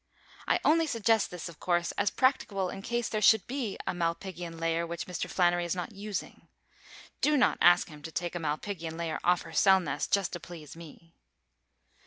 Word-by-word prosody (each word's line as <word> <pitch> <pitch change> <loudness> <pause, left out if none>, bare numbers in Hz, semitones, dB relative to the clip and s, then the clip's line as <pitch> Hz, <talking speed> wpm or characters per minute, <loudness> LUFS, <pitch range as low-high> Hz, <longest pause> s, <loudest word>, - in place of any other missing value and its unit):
I - - +3
only 325 +1 +4
suggest 225 -4 +2
this, 180 -1 -6
of 170 -2 -11
course, 175 -1 0
as 205 -1 0
practicable 205 -8 +1
in 195 - -7
case 235 +2 -1
there 215 - -2
should 215 -1 +5
be 245 -5 -3
a - - -1
malpighian 170 0 -3
layer 165 0 0
which 170 0 -5
Mr. 180 -1 -4
Flannery 175 -1 +2
is 175 +1 -2
not 180 +4 -4
using. 205 0 -6 0.7
Do 300 0 +3
not 255 - +3
ask 175 0 +6
him 150 -2 -12
to 160 - -8
take 175 +1 -3
a 175 - -3
malpighian 160 +1 -4
layer 165 -2 -3
off 180 0 +3
her - - -11
cell 190 -1 +5
nest 180 - -3
just 200 -2 +1
to 175 - -4
please 165 -3 -10
me. 165 0 -13
175 Hz, 195 wpm, -29 LUFS, 170-205 Hz, 0.7 s, ask